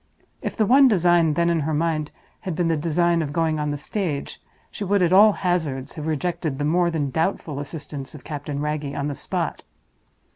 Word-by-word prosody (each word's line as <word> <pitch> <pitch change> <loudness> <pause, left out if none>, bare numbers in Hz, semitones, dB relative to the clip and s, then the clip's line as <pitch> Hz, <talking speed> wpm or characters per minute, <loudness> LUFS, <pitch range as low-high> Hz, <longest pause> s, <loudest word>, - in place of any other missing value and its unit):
If - - -4
the 220 - +3
one 270 +5 +6
design 175 - +3
then 170 +1 +2
in 170 - +1
her 155 +1 -1
mind 155 -1 0 0.3
had 185 -4 -4
been 170 0 +1
the 165 - +2
design 170 +2 +1
of 145 -3 -3
going 160 0 0
on 150 0 -1
the 145 - -2
stage, 155 -2 -4 0.3
she - - -5
would, 200 -1 +2
at 175 +1 +2
all 210 +3 +8
hazards, 160 -9 -2
have 155 0 -6
rejected 160 -2 -2
the 145 - -1
more 170 +3 +2
than 150 -5 -2
doubtful 160 -2 -1
assistance 145 -1 -7
of 140 - -11
Captain 145 -1 -5
Wragge 150 -1 -3
on 145 +1 -2
the - - -3
spot. - - -3
160 Hz, 205 wpm, -23 LUFS, 145-175 Hz, 0.3 s, all